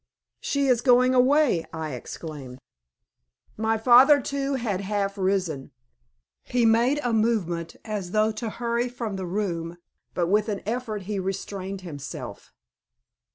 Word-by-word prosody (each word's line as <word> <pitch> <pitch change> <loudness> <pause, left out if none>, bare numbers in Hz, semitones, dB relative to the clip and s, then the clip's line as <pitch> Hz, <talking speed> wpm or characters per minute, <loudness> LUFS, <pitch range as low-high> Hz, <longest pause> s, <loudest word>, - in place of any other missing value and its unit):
"She 280 -1 0
is 250 -3 +3
going 255 0 +5
away!" 255 - +4
I 160 -3 -5
exclaimed. 130 0 -8 1.0
My 220 +1 0
father, 255 +5 +7
too, 275 +1 -2
had 215 -7 -2
half 200 0 -2
risen. 185 -8 -1 0.7
He 245 -1 0
made 235 +6 +3
a 245 -2 0
movement 190 -7 0
as 205 -4 -4
though 215 +3 +2
to 220 +1 -4
hurry 235 +2 -1
from 235 -4 -5
the 190 -1 -4
room, 175 -3 -3 0.4
but 175 - +1
with 210 +5 +1
an 205 -2 -3
effort 220 -2 -3
he 200 +1 -3
restrained 195 0 -4
himself. 150 -6 -8
215 Hz, 135 wpm, -25 LUFS, 185-240 Hz, 1.0 s, father